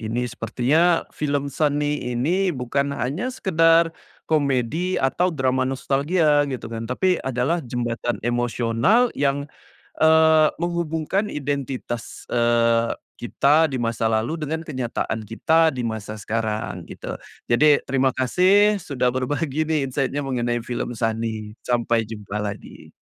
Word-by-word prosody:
Ini 110 +2 -2
sepertinya 135 +10 +1
film, 145 -1 -2
Sunny 150 -1 0
ini, 175 +11 +1
bukan 140 -1 -1
hanya 170 - -2
sekedar 165 -7 +3 0.3
komedi 150 +4 0
atau 175 +7 +1
drama 130 -4 0
nostalgia, 145 +2 +1
gitu 125 -4 -6
kan. 115 0 -5
Tapi 180 +8 +1
adalah 130 +7 -1
jembatan 120 -2 -3
emosional 120 - +2
yang, 140 0 0 0.6
eee, 160 -1 +6
menghubungkan 170 +3 -1
identitas, 135 -4 -4
eee, 115 -1 +2 0.2
kita 150 +6 +3
di 135 - -2
masa 115 -1 0
lalu 110 +8 0
dengan 160 +2 -3
kenyataan 125 -6 -3
kita 160 +9 +3
di 125 - -2
masa 110 -1 -4
sekarang, 110 +1 -3
gitu. - - -7 0.3
Jadi, 145 +5 +4
terima 135 0 +1
kasih 195 +10 +3
sudah 125 -6 -1
berbagi 145 +4 -1
nih 155 -3 +1
insight-nya 140 +2 -2
mengenai 120 -3 -1
film 120 -1 -4
Sunny. 110 -1 -2
Sampai 120 -2 0
jumpa 105 -1 -5
lagi. 105 -1 -7
135 Hz, 125 wpm, -23 LUFS, 120-160 Hz, 0.6 s, eee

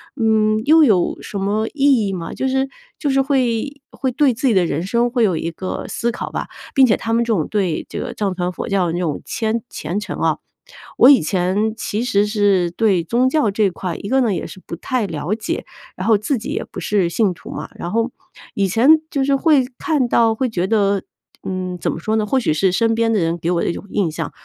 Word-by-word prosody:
嗯， 220 -3 +2
又 315 +4 +6
有 195 -8 +2
什 200 - -5
么 210 +3 0
意 275 -7 +3
义 195 - -2
吗？” 175 -3 -5
就 265 - -2
是 265 +1 0 0.3
就 290 - -2
是 270 0 +3
会 270 0 -1
会 260 -2 -3
对 270 0 +3
自 260 +4 -1
己 240 - +3
的 185 -3 +3
人 160 0 -2
生 235 +5 +1
会 240 -2 +2
有 185 -5 +1
一 165 +1 -3
个 185 +3 -5
思 235 - -1
考 235 - -5
吧。 - - -4 0.3
并 270 - +6
且 220 - +3
他 225 - -4
们 235 +1 +2
这 230 - +1
种 165 -7 -1
对 190 -7 -1
这 - - -5
个 - - -5
藏 200 -3 -1
传 180 -1 -2
佛 - - -5
教 195 -2 +2
的 165 - -2
这 175 - -2
种 160 -5 -2
谦 225 0 -1
虔 195 +5 -4
诚 - - -5
啊， - - +1 0.6
我 255 - +8
以 280 - +8
前 190 +6 0
其 215 0 -3
实 205 -4 +2
是 200 -4 +2
对 190 -2 +2
宗 240 +8 +1
教 265 -5 +2
这 205 0 +2
块， 180 -1 -5
一 - - -7
个 265 +3 +2
呢 230 -5 +1
也 175 - -3
是 190 - -12
不 170 - -6
太 250 +4 -1
了 170 +1 -3
解， 220 - -4 0.3
然 185 - -3
后 220 -2 +5
自 230 +6 -1
己 220 - -6
也 - - -2
不 - - -9
是 195 -5 +1
信 195 +1 +1
徒 - - -13
嘛， - - -6
然 175 - -5
后 230 +2 0 0.4
以 195 -1 0
前 265 - +5
就 275 -3 0
是 275 0 +3
会 280 -2 +3
看 300 -8 0
到 230 -1 +3
会 255 +2 -1
觉 180 -4 -1
得， 200 -2 +1 0.4
嗯， 185 -1 -3
怎 - - -1
么 - - -5
说 215 +6 -1
呢？ 215 -1 +1
或 260 +6 +1
许 230 - +1
是 185 +5 +2
身 225 +4 +2
边 230 0 +1
的 220 - +2
人 165 0 0
给 170 +1 -2
我 175 - +1
的 - - -1
一 - - -1
种 - - -8
印 195 -5 0
象， 160 -1 -4
215 Hz, 265 characters per minute, -19 LUFS, 185-245 Hz, 0.6 s, 我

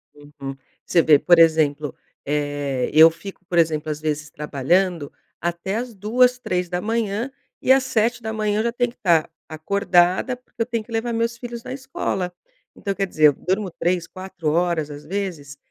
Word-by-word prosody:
Uhum, 145 -2 -9 0.3
você 170 - +4
vê, 150 -3 +6
por 175 +2 +5
exemplo, 155 -3 +3 0.3
eh, 145 -3 -1
eu 160 +1 +9
fico, 185 +3 -11
por 175 0 -2
exemplo, 155 -2 +2
às 150 0 -5
vezes 155 0 -2
trabalhando 150 +3 0 0.3
até 175 +3 -3
às 240 -1 -4
2h, 245 +5 +2
3h 205 +6 -2 0.3
e 260 - +3
às 265 -1 +5
7h 220 -3 0
eu - - +1
já 235 - 0
tenho 245 0 -1
que - - -27
estar 170 -4 +2 0.2
acordada, 180 +6 +1
porque 250 -1 -11
eu - - +2
tenho 230 -2 -3
que 235 - -17
levar 230 +1 -1
meus 230 +1 -1
filhos 235 -1 -7
na - - -6
escola. 225 -9 -3 0.4
Então, 200 -2 -3
quer 195 +1 -1
dizer, 155 -4 +2
eu 145 - +4
durmo 190 +4 -2
3, 175 0 -1
4 185 -4 -5
horas, 170 -2 0
às 145 0 -9
vezes. 160 -5 -5
180 Hz, 170 wpm, -22 LUFS, 155-225 Hz, 0.4 s, eu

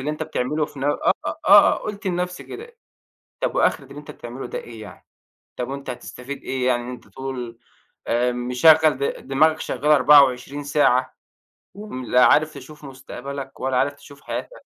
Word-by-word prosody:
اللي 145 +3 -2
أنت 150 - -5
بتعمله 150 +5 -2
في 145 -2 -14
نف 135 - -2 0.4
آه، - - -4
آه، - - +8
قُلت 205 0 -7
لنفسي 180 0 -3
كده، 470 +3 -10 0.6
طَب - - -1
وآخرة - - +1
اللي 140 - -12
أنت 150 - -10
بتعمله 120 +2 -8
ده - - -5
إيه 115 -2 -10
يعني؟! 105 - -13 0.5
طَب 125 - -4
وأنت 140 0 -6
هتستفيد 125 +2 -8
إيه 130 -1 -2
يعني 120 -1 +1
إن 120 - -7
أنت 125 - -11
طول، 125 -3 -7 0.5
آآ، 120 +1 +1
مشغّل 130 +5 +4
د 140 - -3
دماغك 155 +4 +3
شغالة 150 +4 +1
24 140 0 +4
ساعة 130 -3 +2 0.6
و 205 +2 -10
م 130 -10 -6
لا 125 +1 +4
عارف 155 +1 +3
تشوف 150 +1 -12
مستقبلك 135 +1 -8
ولا 130 -1 -1
عارف 140 +3 +1
تشوف 140 0 -16
حياتك! - - -7
140 Hz, 175 wpm, -22 LUFS, 125-150 Hz, 0.6 s, آه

